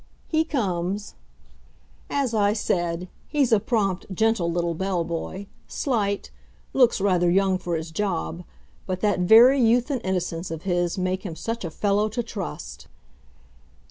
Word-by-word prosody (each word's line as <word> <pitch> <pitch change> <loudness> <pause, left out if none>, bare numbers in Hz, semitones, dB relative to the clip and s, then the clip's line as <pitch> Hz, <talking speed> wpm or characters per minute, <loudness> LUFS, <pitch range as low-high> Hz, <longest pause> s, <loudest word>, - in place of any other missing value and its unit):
He 315 -1 +2
comes. 200 - -2 1.0
As 275 -4 0
I 205 -1 +3
said, 175 -4 -1 0.2
he's 285 -5 +1
a 220 - +5
prompt, 200 -4 -1
gentle 195 -3 +1
little 170 0 0
bell 185 0 -1
boy, 170 +4 -5 0.2
slight, 205 -7 -1 0.4
looks 250 -5 +4
rather 180 -3 +2
young 190 +1 +2
for 175 -2 -2
his 160 0 -4
job, 175 -2 -2 0.4
but 185 -1 -3
that 205 -3 +2
very 235 +9 +7
youth 240 +4 +3
and 260 -4 -1
innocence 180 -2 -2
of 160 0 -6
his 175 -1 0
make 185 0 -1
him 175 -6 -5
such 230 +7 -4
a 170 - -3
fellow 205 +5 +1
to 235 +3 -2
trust! 75 - -7
195 Hz, 145 wpm, -24 LUFS, 175-225 Hz, 1.0 s, very